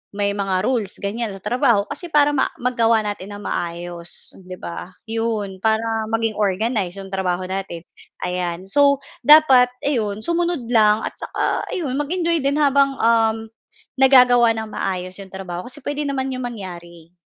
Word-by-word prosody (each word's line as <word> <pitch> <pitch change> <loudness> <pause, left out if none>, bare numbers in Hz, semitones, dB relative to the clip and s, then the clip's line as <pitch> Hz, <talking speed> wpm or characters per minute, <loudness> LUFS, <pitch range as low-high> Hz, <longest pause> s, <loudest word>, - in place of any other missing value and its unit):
may 200 0 0
mga 195 -2 -1
rules 230 -6 -1
ganyan 210 +1 -3
sa 195 - -10
trabaho 235 -4 +2
kasi 360 - -6
para 295 -1 +4
ma 265 - +3 0.2
magawa 230 -3 +2
natin 205 -1 -5
nang 205 0 -9
maayos 175 0 -4
'di 185 0 -8
ba? 175 +2 -7 0.2
'Yon, 225 -4 -2
para 220 0 +2 0.3
maging 225 -1 -1
organized 200 -1 0
'yong 195 - -10
trabaho 185 -2 -1
natin, 190 -3 -4 0.4
ayan. 180 -1 -2
So, 280 +6 +3 0.2
dapat 275 -5 +7 0.2
ayun 215 -7 -1
sumunod 340 -4 -1
lang 215 -2 +4
at - - -4
saka - - -2
ayun, 280 -7 -2
mag-enjoy 335 +2 0
din 280 +1 +1
habang, 275 -1 +3
uhm, 225 -1 +2 0.5
nagagawa 250 -3 +6
nang 220 -1 -5
maayos 185 -1 -3
'yong 195 -1 -11
trabaho 185 -2 -6
kasi 280 +4 -8
puwede 290 +2 -3
naman 270 -1 -2
'yong 255 -1 -4
mangyari, 175 -7 -9
eh. - - -39
220 Hz, 160 wpm, -21 LUFS, 190-260 Hz, 0.5 s, dapat